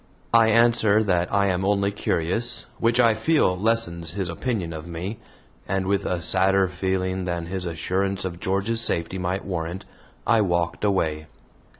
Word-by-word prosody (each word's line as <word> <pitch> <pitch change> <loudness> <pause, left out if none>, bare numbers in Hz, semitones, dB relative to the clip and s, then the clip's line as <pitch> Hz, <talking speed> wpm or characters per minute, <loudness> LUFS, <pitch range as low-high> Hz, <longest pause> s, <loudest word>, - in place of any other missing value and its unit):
I 115 -1 +6
answer 110 -2 +4
that 90 -4 0
I 100 0 +2
am 95 -1 0
only 100 0 +1
curious, 105 +5 0
which 115 +1 +2
I 115 -2 +5
feel 125 - +2
lessens 90 -6 -1
his 95 -3 -3
opinion 90 -2 -3
of 80 +1 -8
me, 90 +6 -5 0.5
and 95 0 -1
with 100 +1 0
a 90 - -1
sadder 95 +3 +3
feeling 95 0 -2
than 85 -1 -3
his 90 +1 -3
assurance 95 +4 -2
of 85 -2 -5
George's 100 +5 -1
safety 85 -3 -1
might 90 +2 -2
warrant, 90 +1 -4 0.4
I 115 -2 +4
walked 85 -2 -1
away. 80 -7 0
95 Hz, 160 wpm, -24 LUFS, 85-105 Hz, 0.5 s, I